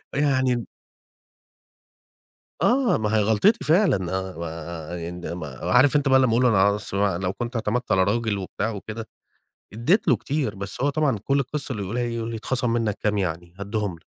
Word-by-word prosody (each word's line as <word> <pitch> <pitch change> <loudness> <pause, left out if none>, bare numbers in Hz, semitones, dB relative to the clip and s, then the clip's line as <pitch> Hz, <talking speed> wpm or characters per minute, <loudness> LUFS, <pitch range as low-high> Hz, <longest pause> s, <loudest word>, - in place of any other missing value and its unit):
يعني 130 -4 +1 2.0
آه، 255 0 +3
ما 110 0 0
هي 110 - +3
غلطتي 110 - +3
فعلًا، 175 - +4 0.2
آآ، 85 -2 -5 0.2
ما 75 -6 -7
د - - -7
عارف 130 +4 +4
أنت 145 -1 +2
بقى 130 0 +6
لما 130 -2 +3
أقول 120 +2 +3
له: 100 0 +5
"بص، 105 - -3
بقى 100 -3 +1
لو 95 0 -1
كنت 120 +5 -5
اعتمدت 120 +3 -1
على 95 0 +4
راجل 110 0 0
وبتاع 100 +3 -3
وكده." 110 +1 -7 0.6
أديت 155 - +1
له 130 - +5
كتير، 140 +4 -2
بس 100 0 -7
هو 140 - +3
طبعًا 145 -6 +1
كل 140 +1 +2
القصة 140 +1 -3
اللي 105 -4 -4
يقولها 110 +6 -2
إيه؟ 120 -1 -2
يقول 115 0 -3
لي: 115 - -4
"اتخصم 120 +2 -1
منك 115 -3 0
كام 105 -1 +1
يعني؟ 85 -2 -3
هاديهم 100 -1 -2
لك." - - -29
110 Hz, 180 wpm, -24 LUFS, 95-130 Hz, 2.0 s, بقى